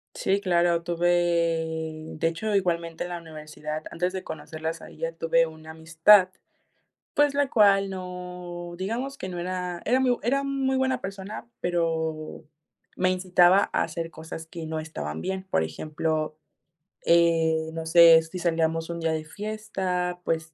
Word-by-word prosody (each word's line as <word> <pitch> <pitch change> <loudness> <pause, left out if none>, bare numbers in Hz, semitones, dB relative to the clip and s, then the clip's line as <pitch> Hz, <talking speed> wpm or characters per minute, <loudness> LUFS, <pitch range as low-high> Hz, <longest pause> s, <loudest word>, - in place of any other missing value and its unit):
Sí, 195 +1 +1
claro. 175 -3 +2
Tuve, 175 0 0 1.1
de 165 - +1
hecho, 200 +6 -2
igualmente 170 -3 0
en 175 - -6
la 175 - -4
universidad, 155 -1 -7
antes 180 +2 -1
de 190 0 -5
conocerlas 160 0 -5
a - - -10
ellas 165 0 -5
tuve 165 0 +3
una 160 0 -10
amistad, 165 +5 +5 0.9
pues, 290 -1 +3
la 285 -1 +2
cual 200 -4 +4
no 180 -2 -7
digamos 235 +9 -3
que 185 - -5
no 180 -1 -5
era 180 0 -3
era 255 +3 +3
muy 250 -2 +3
era 275 +4 +1
muy 270 -1 0
buena 260 -1 +1
persona, 195 +2 -7
pero 160 -3 -2 0.5
me 185 0 +2
incitaba 185 +1 +4
a - - +2
hacer 165 -1 -5
cosas 160 0 -8
que 165 0 -7
no 160 0 -3
estaban 80 - -5
bien. 190 - -3
Por 80 - +2
ejemplo, 155 - -2 0.7
eh, 165 -1 +3
no 165 0 -5
sé, 165 0 +8
si 160 +3 -8
salíamos 165 -1 0
un 170 0 -4
día 165 -1 0
de 155 -1 -2
fiesta, 190 -2 -3
pues, 160 0 -2
175 Hz, 155 wpm, -26 LUFS, 160-190 Hz, 1.1 s, sé